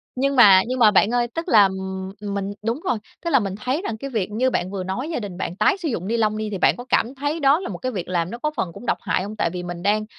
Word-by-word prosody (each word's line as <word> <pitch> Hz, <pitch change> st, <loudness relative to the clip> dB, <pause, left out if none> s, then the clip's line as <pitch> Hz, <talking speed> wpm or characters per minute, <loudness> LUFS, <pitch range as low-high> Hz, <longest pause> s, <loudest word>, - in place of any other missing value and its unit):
nhưng 275 Hz, +2 st, 0 dB
mà 200 Hz, -7 st, +8 dB
nhưng 255 Hz, +1 st, -2 dB
mà 215 Hz, -3 st, +6 dB
bạn 205 Hz, +2 st, +4 dB
ơi, 240 Hz, -1 st, +2 dB
tức 330 Hz, +2 st, -3 dB
là, 210 Hz, -2 st, +7 dB
ừm, 190 Hz, 0 st, -4 dB
ừm, 205 Hz, -1 st, -4 dB
mình 200 Hz, 0 st, -3 dB
đúng 230 Hz, +5 st, -1 dB
rồi, 245 Hz, -, +1 dB, 0.3 s
tức -, -, +1 dB
là 270 Hz, -5 st, +4 dB
mình 195 Hz, -3 st, -3 dB
thấy 255 Hz, -, -2 dB
rằng 225 Hz, -, -4 dB
cái 275 Hz, +5 st, -6 dB
việc 215 Hz, -6 st, -2 dB
như 245 Hz, +5 st, +1 dB
bạn 185 Hz, -6 st, -2 dB
vừa 195 Hz, -2 st, -4 dB
nói 215 Hz, -, -4 dB
gia 320 Hz, -, -2 dB
đình 195 Hz, -5 st, -7 dB
bạn 180 Hz, -, -4 dB
tái 215 Hz, -, +2 dB
sử 350 Hz, -4 st, -4 dB
dụng 190 Hz, -6 st, -3 dB
ni 230 Hz, +2 st, 0 dB
lông 215 Hz, -1 st, +1 dB
đi, 215 Hz, 0 st, -3 dB
thì 205 Hz, -, -3 dB
bạn -, -, +3 dB
có 245 Hz, -, -8 dB
cảm 245 Hz, +4 st, +1 dB
thấy 290 Hz, +4 st, -2 dB
đó 285 Hz, +1 st, +4 dB
là 370 Hz, -, -5 dB
một -, -, -5 dB
cái 255 Hz, -, -3 dB
việc 185 Hz, -7 st, -5 dB
làm 175 Hz, -2 st, -1 dB
nó 235 Hz, -, -5 dB
có 300 Hz, +4 st, -1 dB
phần 170 Hz, -, -1 dB
cũng 245 Hz, -, -11 dB
độc -, -, +1 dB
hại 185 Hz, -, -1 dB
hông? 210 Hz, +2 st, -6 dB
Tại 190 Hz, -, 0 dB
vì 180 Hz, +1 st, -5 dB
mình 175 Hz, -1 st, -6 dB
đang, 210 Hz, +2 st, +1 dB
215 Hz, 325 wpm, -22 LUFS, 190-255 Hz, 0.3 s, mà